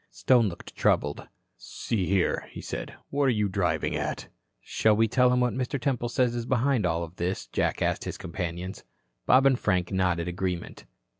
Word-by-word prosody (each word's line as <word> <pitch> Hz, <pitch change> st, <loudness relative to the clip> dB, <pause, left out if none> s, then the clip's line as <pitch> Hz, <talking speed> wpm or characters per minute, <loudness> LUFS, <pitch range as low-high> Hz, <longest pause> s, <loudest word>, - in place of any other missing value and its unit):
Stone 105 Hz, +6 st, +3 dB
looked 85 Hz, -, -11 dB
troubled. 75 Hz, 0 st, +1 dB, 0.3 s
"See 95 Hz, -, -3 dB
here," 95 Hz, -2 st, +1 dB
he -, -, -9 dB
said. -, -, -6 dB, 0.2 s
"What 140 Hz, 0 st, +1 dB
are -, -, +4 dB
you 105 Hz, -4 st, +1 dB
driving 90 Hz, -5 st, 0 dB
at?" -, -, -3 dB, 0.3 s
"Shall 110 Hz, -1 st, +2 dB
we 115 Hz, +1 st, +3 dB
tell 125 Hz, +3 st, +3 dB
him 125 Hz, 0 st, +2 dB
what 125 Hz, -1 st, +1 dB
Mr. 130 Hz, +2 st, -2 dB
Temple 125 Hz, -2 st, -1 dB
says 125 Hz, 0 st, +1 dB
is 120 Hz, 0 st, -4 dB
behind 130 Hz, -4 st, +2 dB
all 85 Hz, 0 st, -1 dB
this?" 85 Hz, -3 st, -3 dB
Jack -, -, -1 dB
asked -, -, -1 dB
his -, -, -5 dB
companions. 90 Hz, 0 st, -5 dB, 0.4 s
Bob 130 Hz, +2 st, +6 dB
and 135 Hz, -2 st, +4 dB
Frank 90 Hz, -3 st, 0 dB
nodded 90 Hz, -3 st, 0 dB
agreement. 90 Hz, 0 st, -4 dB
100 Hz, 175 wpm, -27 LUFS, 90-125 Hz, 0.4 s, Bob